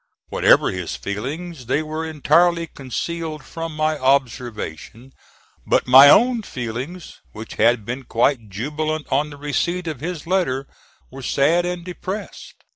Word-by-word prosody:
Whatever - - +4
his 90 -3 -4
feelings, 135 - -5
they 145 +5 +1
were 155 +1 -4
entirely 165 +2 +2
concealed 155 +3 -5
from 165 +1 -6
my 155 0 0
observation; 125 - -2 0.5
but - - +2
my 135 +3 +9
own 240 - +5
feelings, 130 - -6
which 110 +1 -8
had 115 -1 +3
been 125 +4 -4
quite 115 -1 +1
jubilant 150 +9 -3
on 145 +3 +1
the 145 - -11
receipt 170 +5 -2
of 155 -6 -4
his 165 +1 -5
letter, 165 -7 0 0.5
were 135 +1 -9
sad 160 +7 +2
and 175 -1 -4
depressed. 190 +3 -7
145 Hz, 135 wpm, -21 LUFS, 125-165 Hz, 0.5 s, my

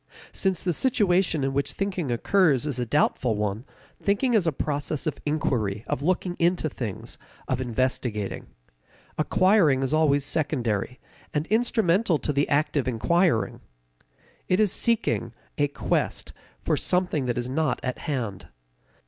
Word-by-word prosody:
Since 190 -3 -1
the 180 - +1
situation 180 - +2
in 135 0 0
which 140 +1 -1
thinking 190 -7 -2
occurs 145 +1 +2
is 140 -4 -2
a 120 - -2
doubtful 125 -3 +1
one, 105 +3 -2 0.4
thinking 205 +5 +1
is 200 -7 +3
a - - +3
process 145 +1 -2
of 155 - -2
inquiry, 115 -9 -1
of - - -2
looking 180 +2 0
into 170 -2 +2
things, 115 -7 -6 0.3
of 130 -1 -1
investigating. 120 -4 -2 0.7
Acquiring 165 -5 +3
is 135 - -1
always 145 -3 +3
secondary, 125 -8 -1 0.4
and 150 +1 0
instrumental 215 -5 +2
to 150 - -2
the 140 +1 +1
act 150 +1 +1
of 135 - 0
inquiring. 145 +3 +1 0.9
It 185 - +2
is 210 -3 +3
seeking, 120 - 0 0.3
a 145 - +3
quest, 145 - -2 0.3
for - - +1
something 180 -7 0
that 120 - -1
is 125 0 -1
not 145 0 0
at 125 - -3
hand. 120 - -4
145 Hz, 145 wpm, -25 LUFS, 125-180 Hz, 0.9 s, is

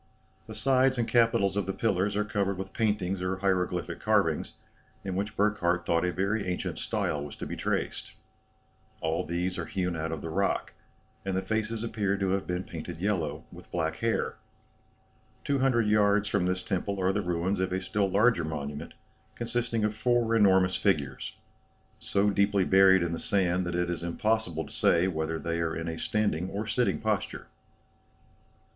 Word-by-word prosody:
The - - -8
sides 130 0 +3
and 115 -1 0
capitals 115 -5 +3
of 100 -2 -1
the 95 - -1
pillars 100 -2 0
are 105 0 +1
covered 100 -2 -1
with 95 0 -6
paintings 105 -4 0
or 90 +1 -1
hieroglyphic 90 -3 -1
carvings, - - +1 0.5
in 95 -2 -3
which 105 +3 -3
Burckhardt 90 -4 +1
thought 85 0 +2
a 90 - +1
very 100 +3 -1
ancient 90 0 -3
style 75 -1 -1
was 75 - -8
to - - -6
be - - -5
traced. - - -2 0.9
All 80 +1 -1
these 90 +3 -2
are 85 - -4
hewn 90 -2 -1
out 80 0 -3
of 80 -3 -5
the 80 - -4
rock, 100 +4 0 0.5
and 95 -1 -1
the - - +1
faces 110 0 -2
appear 105 -4 -1
to 100 -1 0
have 95 0 -1
been 90 +1 -2
painted - - -7
yellow, 90 -5 -1
with - - -13
black 80 -2 -1
hair. 115 0 -1 1.1
Two 140 -1 0
hundred 125 -4 +3
yards 105 -1 +3
from 90 -3 +1
this 90 0 -1
temple 100 +1 -2
are 95 +1 +2
the 105 - 0
ruins 90 +2 -1
of 95 -1 0
a 95 - 0
still 100 0 0
larger 100 -1 +3
monument, 75 0 -5 0.4
consisting 115 -1 -1
of 105 0 +1
four 115 +1 +2
enormous 95 -4 +4
figures, 75 -9 -1 0.6
so 100 +1 +1
deeply 100 -1 +2
buried 95 -1 +6
in 85 - -1
the 85 - -3
sand 90 -2 +1
that 85 - -2
it 90 0 +1
is 85 -1 -3
impossible 85 -1 -1
to - - -12
say 85 +2 +3
whether 80 -2 -2
they 85 +1 -2
are 80 -1 -1
in 85 0 -4
a 80 -1 -4
standing 95 -5 0
or 105 +3 -3
sitting 120 +3 +1
posture." 110 -3 -2
95 Hz, 180 wpm, -28 LUFS, 85-105 Hz, 1.1 s, buried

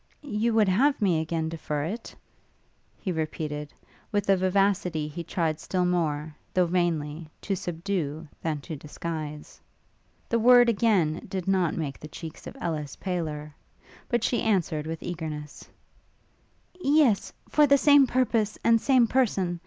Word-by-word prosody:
'You 230 -4 0
would 215 -2 +4
have 265 +10 +3
me 180 -7 +2
again 160 0 -2
defer 155 -2 -3
it?' 215 +9 -5 0.8
he 190 - -3
repeated, 155 -2 -3 0.4
with 205 -2 0
a - - +6
vivacity 185 -4 +1
he 165 +3 -6
tried 160 -2 -1
still 180 +1 -1
more, 155 -4 -1 0.2
though 180 -1 +4
vainly, 165 -3 -1
to 195 - -1
subdue 165 -3 -3
than 155 -3 -2
to 155 - -6
disguise. 150 0 -6 0.7
The 235 - +1
word 245 +1 +7
again 195 -8 +1
did 190 -2 -4
not 185 -4 +1
make 150 -4 -4
the 155 - -8
cheeks 160 +1 -9
of - - -9
Ellis 150 -4 -3
paler; 155 -5 -4 0.6
but 240 -2 +1
she 240 - +1
answered, 170 -8 0
with 165 0 -5
eagerness, 155 -4 -6 1.1
'Yes, 280 - +3 0.2
for 300 -1 +4
the 280 0 +6
same 285 -1 +6
purpose 230 -4 +1
and 230 -1 +4
same 260 -3 +4
person! 195 -8 +1
175 Hz, 145 wpm, -27 LUFS, 155-215 Hz, 1.1 s, word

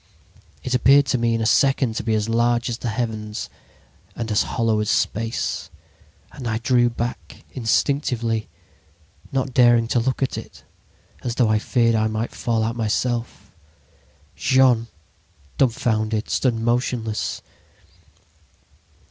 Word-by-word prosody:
It 130 - -3
appeared 135 +3 +5
to 125 - +1
me 115 -1 +1
in 115 - -1
a - - 0
second 130 0 +3
to - - -3
be 110 0 0
as 105 0 -1
large 120 +1 +1
as 115 - -4
the - - -4
heavens 110 -2 -4 0.6
and 115 -2 -4
as 105 - +3
hollow 115 -3 0
as 105 - -1
space. 115 +3 -1 0.6
And 125 - -7
I 110 -1 0
drew 120 +1 +2
back 120 +1 -6
instinctively, 120 -2 0 0.8
not 135 -1 -1
daring 120 -2 +5
to 120 - +2
look 130 +3 -1
at 130 - -2
it, - - -13 0.6
as 120 -3 -3
though 120 -4 +2
I 110 0 +3
feared 115 +1 +2
I 110 0 +2
might 110 +2 -3
fall 115 -2 -1
out 115 +1 -2
myself. 115 -2 -2 0.8
"Jean, 130 -3 +3 0.7
dumfounded, 110 -3 0
stood 125 -3 +1
motionless. 115 -1 -1
115 Hz, 135 wpm, -22 LUFS, 110-125 Hz, 0.8 s, appeared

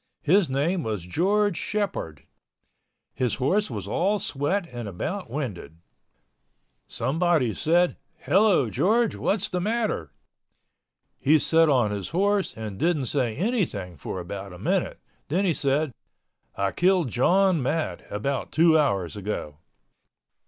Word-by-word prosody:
His 175 +1 +3
name 155 +7 0
was 105 - -3
George 195 - +1
Shepord. 195 - -3 0.9
His 125 -3 -1
horse 190 +11 +1
was 105 -6 -5
all 195 - +1
sweat 175 +3 -1
and 120 -3 -6
about 145 - -4
winded. 115 - -5 1.1
Someone 155 -6 +1
said, 175 +3 +2 0.2
"Hello, 190 - +3
George. 215 - +2
What - - +1
is - - +1
the 180 -2 -2
matter?" 210 - -1 1.1
He 155 +3 +4
set 160 +1 +3
on 125 -7 +3
his 100 -3 -4
horse 200 - 0
and 105 -3 -6
didn't 160 -5 +1
say 125 -6 0
anything 160 - -1
for 80 +5 -6
about 95 +2 -7
a - - -10
minute—then 180 - -2
he 175 - +2
said, 140 +1 0 0.6
"I 100 0 0
killed 180 - +2
John 180 - +3
Matt 130 - -2
about 130 +6 -2
two 160 0 +5
hours 100 - 0
ago." 95 -8 -5
150 Hz, 130 wpm, -25 LUFS, -, 1.1 s, two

